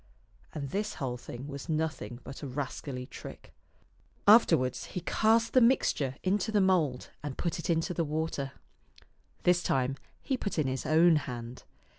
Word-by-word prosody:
And 140 -3 -4
this 210 +1 -2
whole 130 -4 -3
thing 120 +2 -8
was 140 +3 -7
nothing 155 -6 -2
but 135 - -9
a 145 - -5
rascally 130 -1 -4
trick! - - -11 0.7
Afterwards 165 - +5
he 180 - -5
cast 225 +5 +2
the 255 - +6
mixture 155 - +3
into 205 +4 +1
the 210 - +3
mould 170 -10 +1
and 145 -2 -5
put 170 -1 -2
it 165 - -5
into 165 +1 +1
the 170 - 0
water. 150 -3 -2 0.9
This 180 0 +4
time 135 -3 0 0.3
he 265 - 0
put 200 -6 -3
in 155 - +2
his 130 -1 -2
own 160 +1 +6
hand. 125 -3 -6
155 Hz, 160 wpm, -30 LUFS, 135-180 Hz, 0.9 s, the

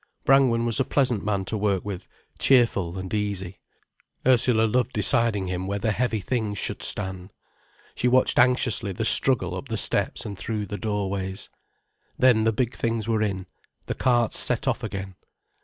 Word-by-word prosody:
Brangwen 130 -4 +3
was 115 +1 +2
a - - +3
pleasant 125 -5 0
man 100 -2 -1
to 110 - -4
work 100 -3 -1
with, 100 -2 -6 0.3
cheerful 105 -9 +2
and 95 +1 -6
easy. 100 -3 -3 0.7
Ursula 125 -3 +4
loved 125 +3 0
deciding 110 -2 +2
him 90 0 -4
where 100 +1 -2
the 110 +2 -1
heavy 115 0 -1
things 110 -1 -2
should - - -3
stand. 95 -1 -2 0.6
She 125 - -1
watched 130 +1 +3
anxiously 120 -4 +2
the 110 - -3
struggle 110 -8 +3
up 90 - -7
the 115 -1 -3
steps - - 0
and 100 - -6
through 105 +1 -3
the 105 0 -6
doorways. 100 -2 -4 0.7
Then 120 -4 +4
the 115 - +3
big 120 +2 -2
things 115 -2 -2
were 110 -2 0
in, 95 -3 -2 0.4
the - - -3
carts 120 -3 +1
set - - -1
off - - 0
again. 95 -1 -6
105 Hz, 170 wpm, -24 LUFS, 95-120 Hz, 0.7 s, Ursula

